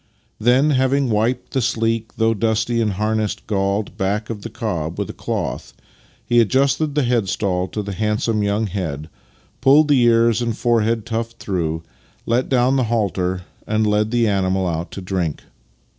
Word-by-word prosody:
Then, 125 +7 +4
having 130 -1 +2
wiped 115 +4 0
the 130 - +1
sleek, 115 -1 -1
though 115 0 +2
dusty 115 +2 0
and 105 -3 0
harness 110 +1 0
galled, 100 0 -2
back 105 +4 -1
of 105 -3 -6
the 115 - -6
cob 90 -8 -3
with - - -3
a - - -13
cloth, - - -4 0.5
he 120 0 +4
ad 110 - +1
justed 140 +4 +1
the 150 - +2
headstall 100 -6 0
to 105 +3 -4
the 100 0 -5
handsome 105 +2 0
young 105 +2 0
head, 80 -6 -4 0.5
pulled 145 +3 +5
the 140 -3 +5
ears 115 -1 +4
and 115 -2 -2
forehead 115 -2 +1
tuft 115 0 -3
through, 80 -6 -2 0.4
let 120 +2 0
down 130 +1 +3
the 130 - +2
halter, 95 -5 -1 0.2
and 110 0 +1
led 105 0 +2
the 120 -1 +2
animal 95 -2 +1
out 85 0 -2
to 95 - -6
drink. 90 -5 -2
110 Hz, 170 wpm, -20 LUFS, 100-120 Hz, 0.5 s, pulled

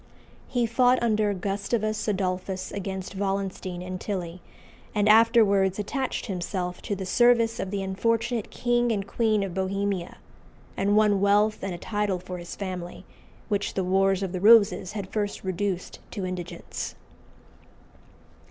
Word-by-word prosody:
He 245 -2 +1
fought 245 +2 +4
under 215 -3 +2
Gustavus 205 +3 -2
Adolphus 185 -1 -2
against 190 -1 -5
Wallenstein 195 -2 -3
and 185 0 -6
Tilly, 180 -3 -4 0.5
and 210 0 +2
afterwards 215 -4 +5
attached 260 +6 -2
himself 180 -2 -3
to 205 - -3
the 190 0 -5
service 235 +2 +3
of 190 - -2
the 195 0 -2
unfortunate 230 +4 -1
King 240 0 +1
and 200 -3 -1
Queen 215 -1 +1
of 190 -3 -4
Bohemia, 190 -1 -2 0.6
and 205 +2 +2
won 210 -2 +4
wealth 205 +2 +3
and 190 -2 -3
a - - -7
title 205 0 -1
for 180 0 -7
his 175 - -8
family, 185 -3 -6 0.4
which 205 -2 -1
the 190 - 0
Wars 195 +1 +2
of 190 - -2
the 180 -1 -4
Roses 205 -3 +5
had 200 -3 -6
first 205 -2 -2
reduced 185 0 -3
to 200 -4 -4
indigence. 180 -2 -5
200 Hz, 145 wpm, -26 LUFS, 185-215 Hz, 0.6 s, afterwards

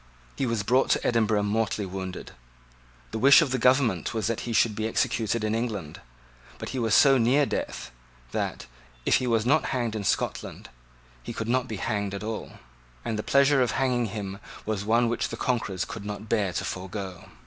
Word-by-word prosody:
He 135 - -1
was 115 -3 -1
brought 130 +6 +2
to - - +2
Edinburgh 110 -3 +2
mortally 105 0 0
wounded. 95 -1 -6 0.8
The - - -3
wish 140 +7 +8
of 140 - -3
the 130 - 0
government 125 - +2
was 110 -3 -1
that 115 +1 -1
he - - -2
should 110 -1 +3
be 110 0 -1
executed 110 0 0
in 110 0 0
England. 110 -9 -3 0.6
But - - -6
he 130 - -3
was 115 -4 +2
so 135 -2 +6
near 130 +5 +4
death, - - -4 0.4
that, - - -3 0.4
if - - +4
he 130 - -2
was 115 -2 +2
not 145 +5 +3
hanged 120 -4 -1
in 105 - -3
Scotland, - - -2 0.5
he - - -7
could 110 - -4
not 125 +1 +1
be 110 - -4
hanged 100 -1 -2
at 100 - -6
all; 110 0 -5 0.5
and 115 - -1
the 105 - -2
pleasure 140 +3 +4
of 125 - +1
hanging 125 -3 +1
him 100 -1 -5 0.3
was 105 -2 -2
one 115 +3 +3
which 120 - -1
the 115 - -6
conquerors 110 -8 -1
could 110 - -7
not 105 +1 -6
bear 105 -4 +1
to - - -2
forego. 95 0 -6
110 Hz, 195 wpm, -26 LUFS, 105-125 Hz, 0.8 s, wish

